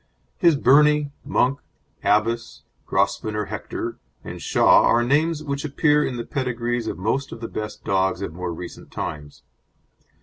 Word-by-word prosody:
His 170 -3 +5
Birnie, 150 +2 +4
Monk, 135 +3 +1 0.4
Abbess, 115 +3 0 0.2
Grosvenor 105 -1 0
Hector, 105 - -5 0.2
and - - -8
Shah - - +5
are 120 - +4
names 155 +5 +1
which 140 -1 -3
appear 150 0 +2
in 125 - -3
the 120 - -4
pedigrees 120 -3 -2
of - - -3
most 115 +9 -1
of - - -8
the 115 - -5
best 105 -1 -6
dogs 95 0 0
of 85 - -5
more 90 0 -4
recent 85 +1 -9
times. 75 -1 -6
120 Hz, 145 wpm, -23 LUFS, 105-140 Hz, 0.4 s, His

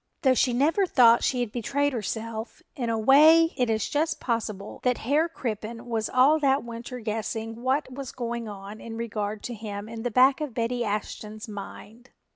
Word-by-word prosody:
Though 260 -2 +5
she 255 +1 +2
never 310 +10 +2
thought 235 -6 +5
she 250 -2 +1
had 235 -3 -2
betrayed 280 +5 -1
herself, 225 0 -5
in 240 -3 -2
a 225 - 0
way 310 +8 +6
it 250 -2 0
is 220 -1 0
just 310 +2 -1
possible 215 -4 -3
that 250 -1 +1
Herr 300 +7 +1
Crippen 230 -4 -5
was 225 -3 -2
all 275 +5 +4
that 275 -1 +2
winter 235 +1 -7
guessing 225 +1 -4
what 260 +1 0
was 270 -1 -6
going 235 -2 -4
on 205 +1 -9
in 225 -1 -7
regard 215 -2 -4
to 245 - -4
him 210 -2 -6
in 225 0 -7
the 245 - -1
back 260 +5 +4
of 285 -6 -4
Betty 240 +1 -1
Ashton's 215 0 -4
mind. 215 +4 -10
235 Hz, 185 wpm, -26 LUFS, 220-260 Hz, -, way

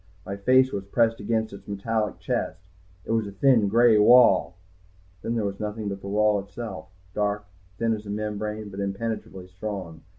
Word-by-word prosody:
My 100 - -4
face 130 +6 +4
was 100 - -3
pressed 115 +2 +1
against 110 +1 -1
its 100 - -12
metallic 105 +2 -2
chest, 90 +2 -3 0.4
it - - -4
was 115 -2 +1
a - - -7
thin 115 0 +3
gray 115 +1 +5
wall.... 105 -6 +6 0.7
Then 115 - -2
there 110 -3 0
was 100 -1 -4
nothing 105 0 -3
but 100 -1 -6
the - - -8
wall 105 +1 +2
itself, 100 -4 -7 0.3
dark, 105 0 -1 0.3
thin 115 +1 +1
as 105 -1 -6
a - - -7
membrane, 105 0 -4
but 95 0 -8
impenetrably 100 -1 -4
strong. 90 -3 -6
105 Hz, 175 wpm, -25 LUFS, 100-115 Hz, 0.7 s, wall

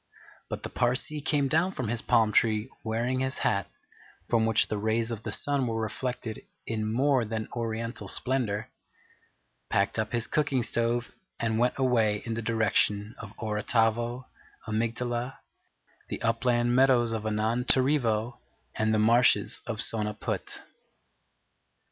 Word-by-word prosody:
But - - -5
the - - -4
Parsee 130 +5 0
came 145 -2 +2
down 165 +7 +2
from 130 - -3
his 115 +1 -2
palm 110 -2 +3
tree, 110 +2 +2
wearing 120 +3 -1
his 130 0 -1
hat, 100 -3 +1 0.6
from 115 -1 +2
which 115 0 +3
the 105 - -2
rays 110 +2 0
of 115 -2 -4
the 110 - -5
sun 135 +4 0
were 115 -1 -1
reflected 115 +1 -3 0.2
in 110 -1 -2
more 130 +1 +3
than 110 0 -3
oriental 115 0 -3
splendour, 120 -5 -1 1.0
packed 100 +3 +1
up 110 0 -1
his 120 -1 -1
cooking 140 -5 +1
stove, 120 +1 -1 0.3
and 115 -1 0
went 125 +1 +2
away 115 -6 +2
in 115 - -2
the 115 - -3
direction 105 -1 +1
of 110 -1 -10
Orotavo, 115 +3 0 0.4
Amygdala, 120 +3 -2 0.7
the - - -4
Upland 120 +1 +2
Meadows 125 -3 +4
of 110 -1 -2
Anantarivo, 115 +2 +2 0.3
and 110 0 +1
the 110 - +3
Marshes 115 +3 +3
of 115 -2 -3
Sonaput. 105 -2 -2
115 Hz, 135 wpm, -28 LUFS, 110-125 Hz, 1.0 s, Meadows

